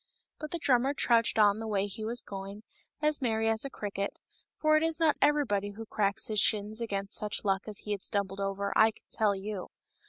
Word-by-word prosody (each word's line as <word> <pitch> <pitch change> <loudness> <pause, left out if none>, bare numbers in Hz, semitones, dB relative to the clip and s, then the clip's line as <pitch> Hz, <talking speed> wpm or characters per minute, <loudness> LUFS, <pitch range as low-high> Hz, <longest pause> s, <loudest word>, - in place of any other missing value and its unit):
But 305 - -5
the 340 - -2
drummer 270 -2 +2
trudged 235 -4 +2
on 210 -1 +5
the 225 - -5
way 200 -2 0
he 205 +2 -6
was 235 +3 -1
going, 195 +2 -8 0.4
as 300 -1 +1
merry 225 -3 +1
as 225 0 +1
a 275 - -4
cricket, 200 -4 -4 0.4
for 310 0 +3
it 310 - +4
is 325 0 +1
not 320 -2 +4
everybody 230 -9 +2
who 225 +2 -8
cracks 210 0 -1
his 215 -1 +1
shins 215 +2 +3
against 200 -3 -2
such 210 0 -2
luck 195 0 0
as 210 -2 -5
he 210 - -6
had 200 -2 -2
stumbled 200 -2 -2
over, 195 0 -2
I 220 - +6
can 220 - -14
tell 210 -2 +2
you. 195 -1 -5
215 Hz, 215 wpm, -30 LUFS, 200-240 Hz, 0.4 s, I